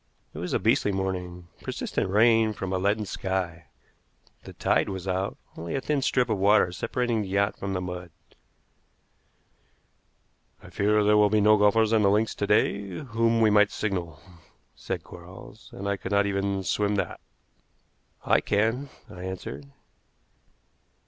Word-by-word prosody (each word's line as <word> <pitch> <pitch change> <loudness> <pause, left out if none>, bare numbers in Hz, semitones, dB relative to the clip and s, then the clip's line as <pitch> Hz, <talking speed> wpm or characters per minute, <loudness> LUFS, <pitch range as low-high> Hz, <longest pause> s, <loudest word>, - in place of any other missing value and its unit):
It - - -8
was - - -4
a - - +2
beastly 105 - +2
morning, 90 -2 -4
persistent - - -3
rain 110 +2 +4
from 95 -2 -4
a 95 - 0
leaden 105 +3 0
sky. 95 -4 -3 0.8
The - - -10
tide - - +1
was 95 -1 -6
out, 95 +1 -2 0.2
only 85 +1 -5
a - - 0
thin 145 0 0
strip 125 -1 +1
of 110 -4 -1
water 100 -2 +4
separating 120 +4 -1
the 100 - -4
yacht 100 +2 +1
from 100 0 -3
the 90 - -2
mud. 90 -1 -6 2.5
"I - - -13
fear 105 +1 +2
there 105 +1 +4
will 105 -1 +5
be 110 +1 +3
no 105 +1 +6
golfers 105 +2 +3
on 110 - +4
the 100 - +4
links 105 +2 +1
to 100 - -3
day 100 -1 +2
to 90 +5 -7
whom 115 -2 +1
we 110 -1 +5
might 105 0 +5
signal," 90 -7 -3 0.6
said - - -5
Quarles; - - -13
"and 100 - -6
I 100 0 0
could 95 - -7
not 100 0 +3
even 100 -1 -1
swim 105 +3 0
that." 100 - -3 1.1
"I - - +3
can," 115 +7 0 0.2
I 90 - -11
answered. 75 -7 -7
100 Hz, 160 wpm, -26 LUFS, 95-110 Hz, 2.5 s, no